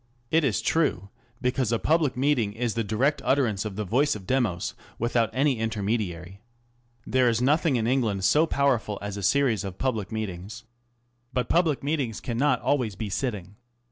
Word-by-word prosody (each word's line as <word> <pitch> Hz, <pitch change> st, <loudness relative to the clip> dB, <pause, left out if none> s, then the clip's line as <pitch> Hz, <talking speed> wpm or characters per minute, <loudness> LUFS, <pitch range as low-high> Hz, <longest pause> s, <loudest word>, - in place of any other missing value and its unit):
It 160 Hz, 0 st, +4 dB
is 120 Hz, -9 st, 0 dB
true, 100 Hz, -, +1 dB, 0.3 s
because 125 Hz, -2 st, 0 dB
a 115 Hz, -, +2 dB
public 155 Hz, -1 st, +1 dB
meeting 125 Hz, -6 st, +1 dB
is 115 Hz, 0 st, -2 dB
the 115 Hz, -, -1 dB
direct 125 Hz, +8 st, 0 dB
utterance 115 Hz, -8 st, +1 dB
of 105 Hz, -3 st, -5 dB
the 105 Hz, +1 st, -3 dB
voice 135 Hz, +8 st, +2 dB
of 100 Hz, -3 st, -9 dB
Demos 90 Hz, -, 0 dB, 0.2 s
without 120 Hz, -1 st, +1 dB
any 135 Hz, -2 st, +1 dB
intermediary. 100 Hz, -4 st, -3 dB, 0.6 s
There 130 Hz, -1 st, +3 dB
is 115 Hz, -1 st, +1 dB
nothing 145 Hz, +3 st, +2 dB
in 115 Hz, -2 st, 0 dB
England 115 Hz, -6 st, 0 dB
so 150 Hz, -, +4 dB
powerful 130 Hz, -9 st, +1 dB
as 100 Hz, 0 st, -5 dB
a 100 Hz, -, -5 dB
series 120 Hz, +1 st, +2 dB
of 95 Hz, -2 st, -6 dB
public 115 Hz, -7 st, -2 dB
meet 110 Hz, -3 st, -2 dB
ings. 100 Hz, +7 st, -9 dB, 0.7 s
But 125 Hz, -2 st, -1 dB
publid 165 Hz, -6 st, +2 dB
meetings 140 Hz, -7 st, -1 dB
cannot 125 Hz, +2 st, 0 dB
always 125 Hz, -8 st, 0 dB
be 105 Hz, 0 st, -5 dB
sitting. 100 Hz, -5 st, -3 dB
115 Hz, 175 wpm, -26 LUFS, 105-135 Hz, 0.7 s, It